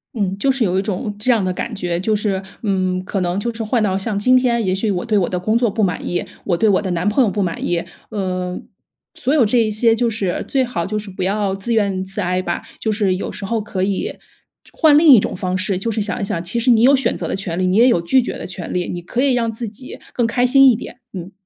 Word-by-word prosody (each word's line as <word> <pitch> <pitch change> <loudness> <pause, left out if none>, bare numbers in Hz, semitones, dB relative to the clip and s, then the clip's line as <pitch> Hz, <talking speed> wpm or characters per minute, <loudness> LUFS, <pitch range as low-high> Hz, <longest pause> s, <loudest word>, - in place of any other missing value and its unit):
嗯， 195 -4 -1
就 270 - +2
是 260 -2 0
有 185 -2 +1
一 - - +1
种 210 +2 -3
这 250 +4 +2
样 225 -4 +2
的 185 - -1
感 235 +6 -5
觉， 175 -3 -2
就 215 +4 0
是， 205 -2 -1 0.2
嗯， 185 -3 0
可 195 0 -2
能 180 +2 -1
就 235 +3 -3
是 225 0 -4
换 225 +2 0
到 190 -3 +1
像 200 +2 -2
今 255 +5 +4
天， 240 -3 +2
也 185 - +1
许 195 +3 -1
我 180 -3 -1
对 225 -2 0
我 175 - 0
的 180 - -2
工 215 +5 0
作 235 -1 +2
不 215 +2 -1
满 180 -2 -1
意、 175 - -2 0.2
我 175 -3 +1
对 220 - +2
我 200 -2 +3
的 195 - -4
男 175 +2 -1
朋 215 +6 +3
友 225 - +2
不 205 0 -1
满 175 -3 -3
意， 170 -1 0 0.3
呃， 185 -3 -3 0.5
所 260 - -2
有 290 -6 +4
这 235 +4 +2
一 225 -2 +2
些 225 +2 +3
就 235 +1 +1
是 200 -5 -2
最 270 -1 +1
好 235 -9 -3
就 210 +4 -3
是 210 -1 -6
不 185 - -7
要 200 +1 0
自 195 +5 -3
怨 200 -3 0
自 190 0 -5
艾 180 +1 0
吧。 - - -3 0.2
就 220 - -1
是 200 -3 +1
有 - - -4
时 195 - -7
候 225 +2 -1
可 200 -3 -3
以 195 0 -2 0.5
就 - - -22
换 305 -3 +5
另 320 +2 +5
一 255 -6 +9
种 - - -3
方 185 -1 -2
式， 185 +1 -1
就 225 +5 -2
是 220 - -1
想 205 +4 -2
一 - - -2
想 175 -4 -2
其 185 +7 -2
实 245 +2 +3
你 225 -2 +4
有 270 +4 +6
选 260 -3 0
择 - - -4
的 - - -2
权 185 -3 -3
利， 185 - +1
你 185 - +1
也 240 +3 +6
有 175 -9 +3
拒 215 +10 +3
绝 - - -4
的 - - -7
权 180 -2 -6
利， 180 -1 -2
你 175 -1 -5
可 240 +8 -2
以 275 -1 +3
让 230 -2 0
自 225 0 -6
己 235 +5 -11
更 240 - +1
开 245 +2 0
心 270 +2 +6
一 - - +1
点， 240 - -9
嗯。 185 -1 -7
205 Hz, 310 characters per minute, -19 LUFS, 185-235 Hz, 0.5 s, 一